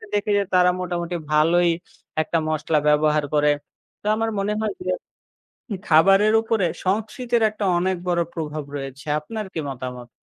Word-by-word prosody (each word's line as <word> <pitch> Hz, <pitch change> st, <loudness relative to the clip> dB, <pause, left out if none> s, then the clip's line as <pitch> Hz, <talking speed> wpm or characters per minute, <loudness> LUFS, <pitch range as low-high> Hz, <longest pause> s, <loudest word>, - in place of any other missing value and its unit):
দেখি 205 Hz, +1 st, 0 dB
যে, 200 Hz, -, +2 dB
তারা 180 Hz, 0 st, +5 dB
মোটামুটি 175 Hz, -1 st, -3 dB, 0.2 s
ভালোই 170 Hz, +3 st, +4 dB, 0.5 s
একটা 165 Hz, +1 st, -1 dB
মশলা 155 Hz, 0 st, +1 dB
ব্যবহার 150 Hz, 0 st, +3 dB
করে। 150 Hz, 0 st, +4 dB, 0.5 s
তো -, -, -25 dB
আমার 225 Hz, 0 st, 0 dB
মনে 205 Hz, +2 st, 0 dB
হয় 215 Hz, -1 st, -1 dB
যে -, -, 0 dB, 1.0 s
খাবারের 195 Hz, +7 st, +5 dB
উপরে 220 Hz, -4 st, +1 dB, 0.2 s
সংস্কৃতির 225 Hz, +4 st, 0 dB
একটা 210 Hz, -1 st, -4 dB
অনেক 185 Hz, +1 st, +1 dB
বড়ো 170 Hz, -1 st, +2 dB
প্রভাব 155 Hz, -2 st, -4 dB
রয়েছে, 135 Hz, +2 st, -7 dB
আপনার 215 Hz, +7 st, -6 dB
কি 160 Hz, -, -3 dB
মতামত? 125 Hz, -2 st, -6 dB
175 Hz, 145 wpm, -23 LUFS, 150-205 Hz, 1.0 s, তারা